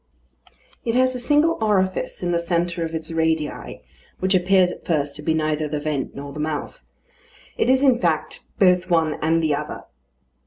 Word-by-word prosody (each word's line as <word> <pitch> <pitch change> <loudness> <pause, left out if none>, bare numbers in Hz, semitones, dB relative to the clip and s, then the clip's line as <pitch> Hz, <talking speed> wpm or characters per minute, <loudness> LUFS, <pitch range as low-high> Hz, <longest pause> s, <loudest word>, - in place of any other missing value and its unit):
It 230 0 -1
has 255 0 +3
a 250 - -3
single 295 +6 +2
orifice 190 -4 0
in 175 - 0
the 170 - +1
centre 170 0 -1
of 165 0 -4
its 160 0 -5
radii, 160 - -2 0.3
which 190 +1 0
appears 185 0 +4
at - - -10
first 145 -4 -1
to - - -8
be 160 +1 0
neither 155 -1 0
the 150 0 -3
vent 145 -2 -3
nor 140 0 -7
the 150 - -7
mouth. 150 -1 -4 0.7
It - - +1
is, 260 +1 +4
in 260 -4 +4
fact, 165 -4 -1 0.2
both 180 -1 +3
one 160 -3 +1
and 165 +1 +2
the 155 -2 +2
other. 150 +1 -4
165 Hz, 185 wpm, -22 LUFS, 155-190 Hz, 0.7 s, appears